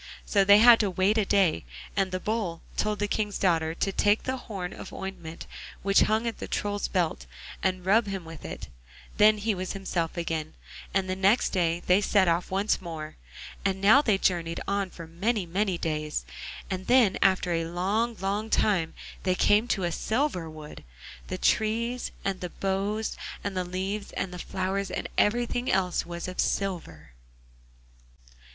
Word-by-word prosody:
So 200 -2 +3
they 200 +1 +8
had 235 +1 +8
to 205 - +2
wait 190 +4 +2
a 210 - +2
day, 190 - +2 0.3
and 195 -1 +1
the 185 - -2
Bull 205 -6 -2
told 210 0 0
the 205 - -1
King's 210 -1 -1
daughter 165 -3 +1
to 195 - -1
take 205 +2 +2
the 260 - -1
horn 195 -7 -6
of - - -9
ointment 175 -4 -7 0.4
which 195 0 +4
hung 220 +2 +1
at 230 - -3
the - - -5
Troll's 205 0 -2
belt, 175 -4 -1 0.3
and 185 -1 -1
rub 210 +3 +4
him 195 -3 -4
with 165 -1 -10
it; - - -7 0.5
then 215 +1 +6
he 210 +1 0
was 185 -1 -4
himself 185 -3 -2
again, 160 -2 -3 0.4
and 195 -1 0
the 185 - -1
next 195 +5 +3
day 175 -2 0
they 185 +3 +4
set 200 -2 +3
off 170 +1 +1
once 195 +2 +1
more. 160 -3 -7 0.5
And 190 -1 0
now 215 +8 +7
they 215 -8 +2
journeyed 170 -3 0
on 200 -1 0
for 170 -2 -10
many, 195 +5 -1
many 185 +2 0
days, 155 -2 -2 0.4
and 185 -1 -4
then 240 -6 +4
after 190 -2 +3
a 165 -1 0
long, 200 +7 -1
long 200 +3 -2
time 185 -8 +1 0.3
they 185 -1 +1
came 210 +5 +3
to 195 -6 0
a 175 - 0
silver 220 - -1
wood. 155 -1 -10 0.4
The - - -4
trees, 230 +3 +1 0.2
and 195 -1 -1
the 180 - -4
boughs, 200 +4 -2 0.3
and 200 -1 -3
the 185 - 0
leaves, 190 +3 -3
and 190 -2 -3
the 180 - -7
flowers, 190 +2 -2
and - - -3
everything 240 +3 +1
else 180 -3 +1
was 170 0 -5
of 185 - -7
silver. 85 - -2
195 Hz, 175 wpm, -27 LUFS, 175-210 Hz, 0.5 s, they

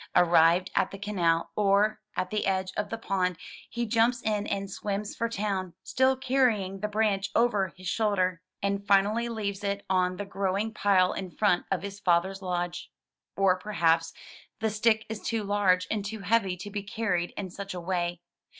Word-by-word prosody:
Arrived 175 +1 +5
at - - +2
the 195 - -8
canal 175 -5 0
or 210 +1 +2 0.2
at 185 - -1
the 210 -1 -1
edge 190 -1 0
of 210 -1 -2
the 225 - -3
pond, 185 -5 -1 0.3
he 235 +1 -2
jumps 230 +2 +2
in 210 -1 0
and 195 0 -3
swims 205 +1 -3
for 230 0 -1
town, 195 -5 -2
still 260 +1 +2
carrying 245 -8 +1
the 210 - -1
branch 205 -2 0
over 210 -5 +3
his 185 0 -8
shoulder, 185 -4 +1 0.2
and 200 0 -1
finally 205 +4 +3
leaves 205 -3 -3
it 200 0 -2
on 185 -1 +2
the 205 - -4
growing 195 +2 -1
pile 195 -4 +3
in 190 -2 -5
front 180 -1 +1
of 195 -1 -1
his 200 0 -6
father's 190 +1 +1
lodge. 175 -1 -3 0.5
Or 190 -2 +3
perhaps 165 -5 +1 0.5
the 220 0 0
stick 220 +1 +2
is 220 -1 -6
too 225 -2 -1
large 195 -3 +2
and 210 -2 -1
too 215 +1 -5
heavy 195 -2 +1
to 205 +3 -8
be 205 0 -3
carried 200 -4 -1
in 190 -3 -4
such 200 0 -6
a - - -4
way. 175 -1 -2
200 Hz, 180 wpm, -28 LUFS, 185-215 Hz, 0.5 s, Arrived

